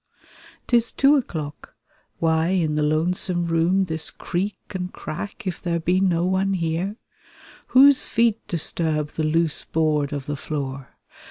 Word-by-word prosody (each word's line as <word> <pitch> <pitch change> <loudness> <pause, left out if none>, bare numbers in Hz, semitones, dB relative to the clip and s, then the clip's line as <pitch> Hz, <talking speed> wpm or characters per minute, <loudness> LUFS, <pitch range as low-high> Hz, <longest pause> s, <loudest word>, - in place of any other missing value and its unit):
'Tis 235 -1 +2
two 275 +2 +4
o'clock! 155 - -4 0.4
Why 160 0 +1
in 175 -4 +1
the 150 - 0
lonesome 175 +3 +1
room 170 +3 +2
This 160 -2 -1
creak 195 +4 -3
and 180 -1 -4
crack, 175 +8 -7
if 185 -2 -4
there 170 -1 -1
be 180 +3 +1
no 175 -3 +2
one 190 +1 +1
here? 170 +4 -2 0.7
Whose 275 +1 +6
feet 230 -1 +2
disturb 155 -2 0
the 155 - -3
loose 160 0 +1
board 155 -3 0
of 140 -2 -4
the 145 - -3
floor? 140 -2 -6
170 Hz, 145 wpm, -23 LUFS, 155-190 Hz, 0.7 s, Whose